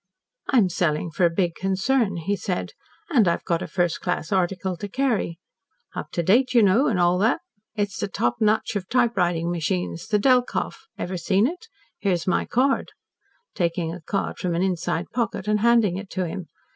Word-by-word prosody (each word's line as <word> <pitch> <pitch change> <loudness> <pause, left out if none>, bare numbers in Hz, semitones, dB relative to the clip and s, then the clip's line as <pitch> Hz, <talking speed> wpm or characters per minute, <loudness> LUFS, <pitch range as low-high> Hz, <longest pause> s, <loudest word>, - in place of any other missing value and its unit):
"I'm 235 -8 +4
selling 165 -1 0
for 175 +2 +3
a - - 0
big 170 0 0
concern," 195 +4 0
he 185 +5 -1
said, 190 -2 -3 0.4
"and 235 - +4
I've 170 - +1
got 170 -2 0
a - - -4
first 175 -3 0
class 175 -2 -2
article 185 0 0
to 205 - -5
carry. 220 -7 -1 0.6
Up - - -5
to 170 - 0
date, 250 +8 +3
you 235 - +7
know, 210 +9 +4
and 205 -6 +1
all 175 +1 +3
that. 225 - +2 0.3
It's 205 -2 -2
the - - -1
top 120 -10 -1
notch 215 0 +1
of 190 -2 -3
typewriting 180 -9 +1
machines, 90 - -2
the 210 - +2
Delkoff. 250 - +1
Ever 185 +1 -3
seen 190 +4 +2
it? 360 - -4 0.3
Here's 180 -4 0
my 185 - +1
card," 270 +3 +1 0.6
taking 170 -1 -1
a 180 - -8
card 195 +5 -3
from 180 -3 -1
an 175 - +1
inside 180 -2 -1
pocket 225 -4 -2
and 210 0 +2
handing 225 -5 +3
it 195 0 -7
to 185 -1 -1
him. 175 +1 -5
190 Hz, 185 wpm, -24 LUFS, 175-220 Hz, 0.6 s, you